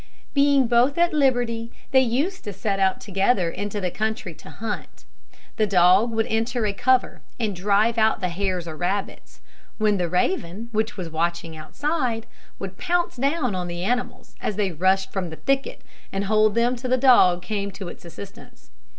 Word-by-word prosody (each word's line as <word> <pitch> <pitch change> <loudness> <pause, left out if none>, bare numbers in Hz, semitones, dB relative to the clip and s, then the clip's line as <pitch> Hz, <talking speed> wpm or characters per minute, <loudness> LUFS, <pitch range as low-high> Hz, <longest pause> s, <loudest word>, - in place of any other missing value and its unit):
Being 280 -2 +4
both 245 +5 +3
at 345 0 +3
liberty, 245 -5 +1 0.2
they 265 - +6
used 280 +11 -1
to 205 - -4
set 195 +1 -2
out 190 -1 +2
together 195 -2 +1
into 205 +3 -4
the 180 -3 -2
country 215 -4 -3
to 155 - -14
hunt. 220 -1 -6 0.5
The 215 - +2
dog 185 +4 +5
would 225 -1 0
enter 225 +1 -1
a 205 - 0
cover 255 +5 +1 0.2
and 215 -4 -1
drive 210 +5 +2
out 220 0 +3
the 180 - -1
hares 180 -1 -2
or 160 - -6
rabbits, 190 +4 -4 0.4
when 215 -2 +2
the 175 -2 -1
raven, 195 - -1
which 220 +2 -1
was 175 -4 -5
watching 170 0 -2
outside, 240 - -2 0.3
would 190 -1 -7
pounce 350 -5 0
down 275 -2 0
on 180 -1 -3
the 175 0 -5
animals 245 +5 -3
as 210 - -2
they 200 -2 0
rushed 190 +3 +1
from 190 -3 -2
the 160 - -7
thicket, 275 - -1 0.3
and 195 +1 -2
hold 215 +1 +3
them 240 +2 +2
till 250 +1 -5
the 255 - +3
dog 190 -9 +5
came 200 +1 -3
to 195 - -7
its - - -10
assistance. 200 +6 -12
215 Hz, 180 wpm, -23 LUFS, 185-245 Hz, 0.5 s, they